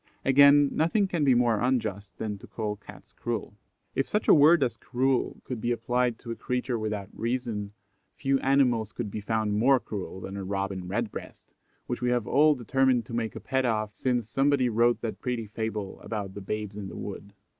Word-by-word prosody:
Again, 140 Hz, +1 st, +7 dB
nothing 195 Hz, +6 st, +2 dB
can 170 Hz, -5 st, -1 dB
be 135 Hz, -3 st, +5 dB
more 120 Hz, -3 st, +3 dB
unjust 110 Hz, -6 st, -1 dB
than 105 Hz, -2 st, -4 dB
to -, -, -12 dB
call 105 Hz, -2 st, -3 dB
Cats 105 Hz, -, -14 dB
cruel. 115 Hz, -3 st, -4 dB, 0.4 s
If 135 Hz, -, 0 dB
such 210 Hz, -, -1 dB
a -, -, +8 dB
word 155 Hz, +1 st, +6 dB
as 120 Hz, -3 st, -1 dB
cruel 130 Hz, +2 st, -1 dB
could 125 Hz, -4 st, -5 dB
be 120 Hz, -, 0 dB
applied 120 Hz, +1 st, 0 dB
to 115 Hz, -, -8 dB
a -, -, -3 dB
creature 125 Hz, -1 st, -2 dB
without 105 Hz, -2 st, -3 dB
reason, 115 Hz, -4 st, -3 dB, 0.4 s
few 135 Hz, 0 st, +1 dB
animals 125 Hz, -6 st, +2 dB
could 110 Hz, -4 st, -4 dB
be 105 Hz, -, -4 dB
found 110 Hz, 0 st, 0 dB
more 130 Hz, +3 st, +5 dB
cruel 100 Hz, -4 st, -6 dB
than 95 Hz, +1 st, -6 dB
a 100 Hz, -, -4 dB
Robin 95 Hz, -1 st, -3 dB
Redbreast, 105 Hz, +3 st, -5 dB, 0.3 s
which -, -, -4 dB
we 125 Hz, -, +1 dB
have 120 Hz, -3 st, +1 dB
all 150 Hz, +1 st, +4 dB
determined 130 Hz, -1 st, +2 dB
to 115 Hz, -, -10 dB
make 115 Hz, -1 st, -2 dB
a -, -, -5 dB
pet 130 Hz, -1 st, -1 dB
of 110 Hz, -3 st, 0 dB
since 125 Hz, -1 st, -1 dB
somebody 135 Hz, +1 st, +2 dB
wrote 120 Hz, +1 st, +2 dB
that 115 Hz, -2 st, -4 dB
pretty 120 Hz, -3 st, -2 dB
fable 105 Hz, -2 st, -4 dB
about 100 Hz, -4 st, -4 dB
the 100 Hz, -, -7 dB
"Babes 105 Hz, +1 st, -4 dB
in 105 Hz, -2 st, -5 dB
the -, -, -8 dB
Wood." 100 Hz, 0 st, -7 dB
115 Hz, 200 wpm, -27 LUFS, 105-130 Hz, 0.4 s, a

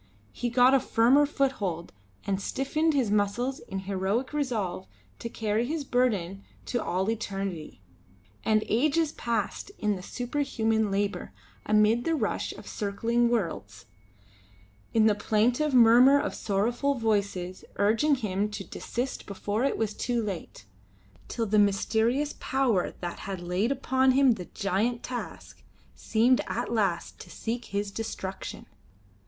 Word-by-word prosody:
He 240 Hz, -, -3 dB
got 250 Hz, +2 st, +5 dB
a 270 Hz, -, +6 dB
firmer 260 Hz, +6 st, +4 dB
foothold 205 Hz, -, -2 dB, 0.3 s
and 195 Hz, 0 st, -1 dB
stiffened 305 Hz, +7 st, 0 dB
his 250 Hz, -7 st, +1 dB
muscles 210 Hz, +6 st, 0 dB
in 195 Hz, -, -6 dB
heroic 200 Hz, +7 st, -1 dB
resolve 215 Hz, -11 st, -2 dB, 0.3 s
to 235 Hz, -, -5 dB
carry 220 Hz, +1 st, -1 dB
his 310 Hz, +1 st, -2 dB
burden 205 Hz, -8 st, 0 dB, 0.2 s
to 245 Hz, -, -2 dB
all 185 Hz, +2 st, -1 dB
eternity. 195 Hz, -, -5 dB, 0.6 s
And 215 Hz, -1 st, +2 dB
ages 300 Hz, +6 st, +2 dB
passed 230 Hz, -, -3 dB
in 210 Hz, -2 st, 0 dB
the 185 Hz, -, -7 dB
superhuman 225 Hz, -2 st, -1 dB
labour, 200 Hz, +1 st, -2 dB, 0.3 s
amidst 215 Hz, +3 st, +3 dB
the 330 Hz, -, +1 dB
rush -, -, -1 dB
of -, -, -12 dB
circling 230 Hz, +3 st, 0 dB
worlds; 160 Hz, -, -3 dB, 1.1 s
in 220 Hz, -1 st, +4 dB
the 215 Hz, -, +5 dB
plaintive 235 Hz, +8 st, +1 dB
murmur 245 Hz, +4 st, +7 dB
of -, -, -2 dB
sorrowful 235 Hz, +8 st, 0 dB
voices 200 Hz, -6 st, -1 dB
urging 225 Hz, +9 st, +3 dB
him 210 Hz, -4 st, -1 dB
to 210 Hz, -1 st, -6 dB
desist 245 Hz, +6 st, -5 dB
before 205 Hz, +3 st, -2 dB
it 275 Hz, -, +1 dB
was 215 Hz, -2 st, -1 dB
too 240 Hz, +1 st, -1 dB
late 190 Hz, -, -6 dB, 0.6 s
till 230 Hz, -, -2 dB
the 215 Hz, 0 st, +2 dB
mysterious 225 Hz, +8 st, +2 dB
power 250 Hz, -9 st, 0 dB
that 175 Hz, -1 st, -5 dB
had 190 Hz, -2 st, -3 dB
laid 180 Hz, +7 st, -1 dB
upon 260 Hz, -1 st, +2 dB
him 270 Hz, -1 st, +5 dB
the 195 Hz, -6 st, -3 dB
giant 210 Hz, +6 st, -1 dB
task 245 Hz, -1 st, -7 dB, 0.3 s
seemed 240 Hz, +3 st, +2 dB
at -, -, -2 dB
last 200 Hz, -6 st, -1 dB
to -, -, -11 dB
seek 235 Hz, +1 st, -4 dB
his 200 Hz, 0 st, -3 dB
destruction. 195 Hz, -3 st, -6 dB
225 Hz, 135 wpm, -28 LUFS, 200-250 Hz, 1.1 s, murmur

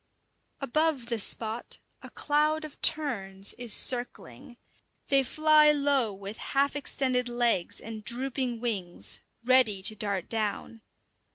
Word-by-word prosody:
Above 295 Hz, -1 st, 0 dB
the 235 Hz, -2 st, -1 dB
spot 220 Hz, +3 st, -2 dB, 0.2 s
a -, -, -11 dB
cloud 305 Hz, +1 st, 0 dB
of 300 Hz, -, -13 dB
terns 200 Hz, -10 st, +1 dB
is 240 Hz, -2 st, -4 dB
circling. 240 Hz, -, -1 dB, 0.5 s
They 275 Hz, -1 st, +6 dB
fly 305 Hz, +3 st, +4 dB
low 280 Hz, -6 st, +1 dB
with 200 Hz, +2 st, -9 dB
half 280 Hz, +1 st, 0 dB
extended 255 Hz, -3 st, -1 dB
legs 240 Hz, -7 st, 0 dB
and 220 Hz, -1 st, -8 dB
drooping 250 Hz, -1 st, -1 dB
wings, 195 Hz, -8 st, -2 dB, 0.2 s
ready 245 Hz, -7 st, +4 dB
to 215 Hz, -, +3 dB
dart 200 Hz, -4 st, -2 dB
down. 225 Hz, +1 st, -4 dB
240 Hz, 120 wpm, -28 LUFS, 215-280 Hz, 0.5 s, They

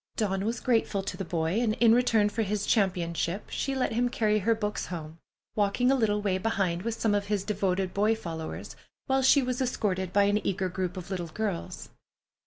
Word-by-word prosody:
Dawn 195 Hz, -2 st, -1 dB
was 230 Hz, +2 st, -1 dB
grateful 225 Hz, -5 st, +1 dB
to 195 Hz, -, -4 dB
the 195 Hz, -, -4 dB
boy, 165 Hz, +3 st, -1 dB
and 225 Hz, -3 st, +1 dB
in 230 Hz, -2 st, +5 dB
return 230 Hz, -4 st, +3 dB
for 225 Hz, +2 st, -2 dB
his 205 Hz, -1 st, -1 dB
championship 180 Hz, -3 st, 0 dB
she 275 Hz, -1 st, -2 dB
let 255 Hz, -3 st, 0 dB
him 245 Hz, +2 st, +1 dB
carry 215 Hz, -3 st, +1 dB
her 225 Hz, +3 st, +2 dB
books 210 Hz, -1 st, -3 dB
home, 160 Hz, -2 st, -7 dB, 0.4 s
walking 215 Hz, +5 st, +2 dB
a -, -, +4 dB
little 210 Hz, -4 st, +1 dB
way 190 Hz, -2 st, +1 dB
behind 190 Hz, -5 st, 0 dB
with 230 Hz, +2 st, -3 dB
some 220 Hz, -2 st, +2 dB
of 205 Hz, 0 st, 0 dB
his 205 Hz, -2 st, 0 dB
devoted 195 Hz, -2 st, -1 dB
boy 210 Hz, +3 st, +2 dB
followers, 165 Hz, -6 st, -6 dB, 0.3 s
while 265 Hz, 0 st, +2 dB
she 265 Hz, +1 st, +5 dB
was 250 Hz, +1 st, -2 dB
escorted 190 Hz, -7 st, -1 dB
by 200 Hz, +1 st, +4 dB
an 205 Hz, +1 st, +2 dB
eager 190 Hz, -1 st, -1 dB
group 185 Hz, 0 st, -3 dB
of 185 Hz, +2 st, -7 dB
little 175 Hz, -3 st, -3 dB
girls. 195 Hz, +1 st, -4 dB
205 Hz, 200 wpm, -28 LUFS, 185-225 Hz, 0.4 s, in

